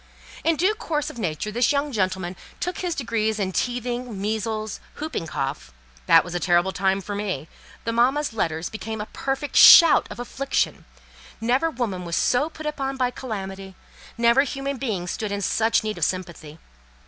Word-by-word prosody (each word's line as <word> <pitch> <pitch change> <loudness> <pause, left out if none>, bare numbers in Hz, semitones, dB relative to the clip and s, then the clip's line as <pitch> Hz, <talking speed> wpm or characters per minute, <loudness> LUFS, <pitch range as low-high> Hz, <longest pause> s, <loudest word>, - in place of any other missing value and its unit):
In 330 0 +3
due 370 +7 +2
course 305 -8 -3
of 240 - -11
nature 180 +1 -2
this 240 +2 +2
young 285 0 0
gentleman 190 -4 -1 0.2
took 360 - -3
his 355 -3 -2
degrees 220 -4 -1
in 195 -3 -1
teething, 245 0 -2
measles, 215 +1 -2 0.2
hooping 300 - -4
cough: 135 - -4 0.4
that - - +7
was 175 - -8
a 175 - -1
terrible 175 +1 +2
time 190 +1 0
for 205 +2 -6
me—the 200 +3 -5
mamma's 260 +4 +2
letters 165 -5 -1
became 220 0 -6
a 210 - -3
perfect 270 +5 -4
shout 335 -3 +9
of - - -9
affliction; 270 +3 -2 0.5
never 255 +8 +1
woman 230 - -3
was 170 -1 -3
so 270 +5 +2
put 310 -1 -10
upon 275 -3 -3
by 250 -1 +1
calamity: 195 -6 -6 0.4
never 235 +3 +5
human 275 0 -3
being 215 -9 -2
stood 205 +4 -4
in 200 - -2
such 225 +3 +2
need 215 -1 -3
of - - -2
sympathy. 170 -4 -3
225 Hz, 170 wpm, -24 LUFS, 190-270 Hz, 0.5 s, shout